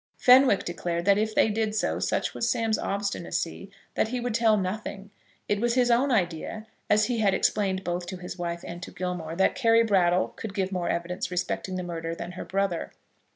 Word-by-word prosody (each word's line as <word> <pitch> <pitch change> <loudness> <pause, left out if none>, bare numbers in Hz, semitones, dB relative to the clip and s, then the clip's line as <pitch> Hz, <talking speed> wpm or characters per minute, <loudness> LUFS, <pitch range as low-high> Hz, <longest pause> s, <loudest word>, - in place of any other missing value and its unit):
Fenwick 255 -4 +6
declared 170 0 -3
that, 200 0 +4
if 215 0 -1
they - - +4
did 215 0 -1
so, 220 - 0
such - - -1
was 230 - -1
Sam's 225 -1 +1
obstinacy 195 -2 -3 0.2
that - - +1
he 250 +2 -3
would 245 -1 -2
tell 225 -1 +4
nothing. 200 +1 -4 0.4
It 205 0 0
was 240 0 +1
his 245 -1 +3
own 260 +4 +3
idea, 195 +1 -1 0.2
as 210 0 +4
he 240 -1 -1
had 200 -3 +3
explained 190 -2 +1
both 175 0 -3
to 185 +1 -5
his 180 0 -7
wife 170 -1 -4
and 175 +1 -7
to - - -7
Gilmore, 180 -3 -4
that 190 - +3
Carry 230 -2 +4
Brattle 185 -4 +2
could 205 -3 -8
give 190 -2 -1
more 180 -2 -2
evidence 175 +2 -2
respecting 185 +1 -2
the 180 - -3
murder 165 -1 -4
than 170 +1 -6
her 180 - -7
brother. 195 -3 -2
195 Hz, 200 wpm, -27 LUFS, 175-220 Hz, 0.4 s, Fenwick